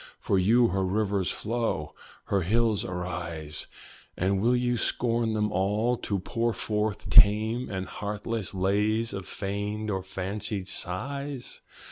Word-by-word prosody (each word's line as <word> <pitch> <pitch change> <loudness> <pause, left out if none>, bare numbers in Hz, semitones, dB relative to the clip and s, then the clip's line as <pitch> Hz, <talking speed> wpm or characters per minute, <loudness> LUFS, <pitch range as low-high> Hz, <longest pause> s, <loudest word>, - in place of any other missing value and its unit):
For 95 - +1
you 115 +6 +5
her 95 +1 0
rivers 100 -1 0
flow, 115 -9 -2 0.3
her 100 - +1
hills 110 +3 +2
arise! 85 -4 -4 0.5
And 95 +1 +1
will 120 +3 +4
you 125 0 +1
scorn 115 -1 0
them 105 -1 0
all, 105 +6 +1
to 100 - -2
pour 115 +5 -1
forth 105 -1 -1
tame 110 +2 +6
And 95 -2 -3
heartless 105 -1 -3
lays 105 +4 +1
of 95 -1 -5
feigned 105 +2 -3
or 95 -1 -1
fancied 95 +1 -3
sighs? 135 +9 -4
105 Hz, 130 wpm, -28 LUFS, 95-115 Hz, 0.5 s, tame